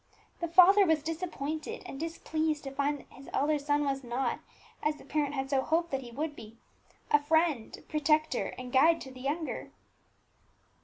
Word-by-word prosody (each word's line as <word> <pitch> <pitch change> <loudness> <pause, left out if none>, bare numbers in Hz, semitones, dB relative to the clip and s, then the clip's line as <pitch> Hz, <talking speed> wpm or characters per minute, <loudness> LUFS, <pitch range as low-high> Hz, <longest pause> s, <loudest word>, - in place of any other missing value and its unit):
The 340 - -1
father 370 +4 +7
was 320 -5 +2
disappointed 315 -2 -4
and 270 - -7
displeased 315 -1 -2
to 270 - -5
find 285 +1 0
that - - -24
his 270 +1 -12
elder 295 +1 +2
son 290 +1 +1
was 270 -1 -1
not, 245 +2 -1 0.4
as 300 0 +1
the - - -15
parent 295 -2 -1
had 270 0 -3
so 270 -1 +3
hoped 335 +4 0
that 270 -1 -1
he 245 - -9
would 295 +5 -4
be, 225 -1 -12 0.5
a 295 - +5
friend, 315 -5 +1
protector, 305 -2 +1
and 250 -1 -7
guide 325 +5 +5
to 265 - -8
the 255 -1 -11
younger. 300 +4 -3
295 Hz, 175 wpm, -30 LUFS, 270-320 Hz, 0.5 s, father